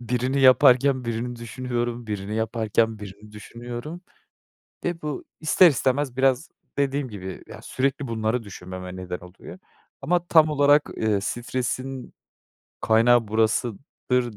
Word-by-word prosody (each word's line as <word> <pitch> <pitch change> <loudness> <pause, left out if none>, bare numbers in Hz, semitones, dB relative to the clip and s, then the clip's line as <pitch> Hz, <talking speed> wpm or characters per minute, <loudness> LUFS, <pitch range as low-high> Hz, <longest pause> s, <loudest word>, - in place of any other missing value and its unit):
birini 125 +3 -1
yaparken 130 0 +5
birini 120 +1 -3
düşünüyorum, 120 0 -4
birini 105 -1 -4
yaparken 110 0 0
birini 105 +1 -11
düşünüyorum 120 - -8 0.8
ve 175 -1 -3
bu, 150 -2 -4 0.2
ister 165 +3 +6
istemez, 135 -1 0
biraz 135 +2 +2 0.3
dediğim 140 -1 0
gibi, 95 -4 -8
ya, - - -10
sürekli 135 +1 -2
bunları 115 +1 -1
düşünmeme 95 -2 -8
neden 90 -1 -5
oluyor. 90 +1 -12 0.4
Ama 175 0 0
tam 160 -2 +5
olarak, 145 0 +4
eee, 110 -2 +1
stresin 125 +3 -4 0.7
kaynağı 115 +1 +4
burasıdır 115 +2 -1
120 Hz, 115 wpm, -24 LUFS, 110-135 Hz, 0.8 s, ister